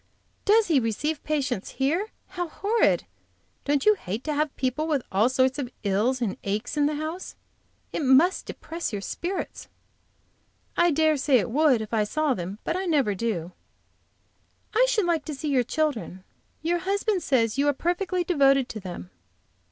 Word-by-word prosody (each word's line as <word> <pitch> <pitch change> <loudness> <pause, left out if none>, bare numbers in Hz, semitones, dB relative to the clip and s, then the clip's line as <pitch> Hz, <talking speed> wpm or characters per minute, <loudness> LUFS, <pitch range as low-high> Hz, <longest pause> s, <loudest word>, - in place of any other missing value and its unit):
"Does 435 +2 +5
he 320 -7 +3
receive 280 +7 -2
patients 275 -9 -2
here? 320 +10 0 0.2
How 355 -2 -3
horrid! 415 +7 +1 0.6
Don't 290 -1 +1
you 425 - +7
hate 220 - -5
to 305 - -2
have 295 0 -1
people 260 +4 -1
with 290 -6 0
all 205 +5 +3
sorts 260 +1 +2
of 255 -4 -3
ills 220 +6 +1
and 205 - -2
aches 210 +7 -2
in 290 -1 +3
the 300 - -1
house? 315 +5 -5 0.6
It - - -1
must 275 +8 +4
depress 335 -3 -5
your 200 -2 -4
spirits." 365 - -4 1.1
"I 345 0 +4
dare 315 -1 +3
say 275 -1 +3
it 225 +1 -1
would 280 -3 +4
if 215 +1 -7
I 215 -2 +3
saw 300 +6 0
them; 185 -1 -5
but - - -1
I 375 +1 -2
never 280 -11 +2
do." 185 -5 -2 1.2
"I - - +4
should 440 -6 +2
like 335 -3 +1
to 305 - -4
see 300 +2 -4
your 265 -3 +3
children. 245 - -2 0.4
Your 345 +2 +1
husband 400 +1 0
says 250 -5 +1
you 285 - +3
are - - +5
perfectly 355 +4 -1
devoted 275 -6 +3
to 220 - -5
them." 175 - -8
285 Hz, 175 wpm, -26 LUFS, 235-335 Hz, 1.2 s, you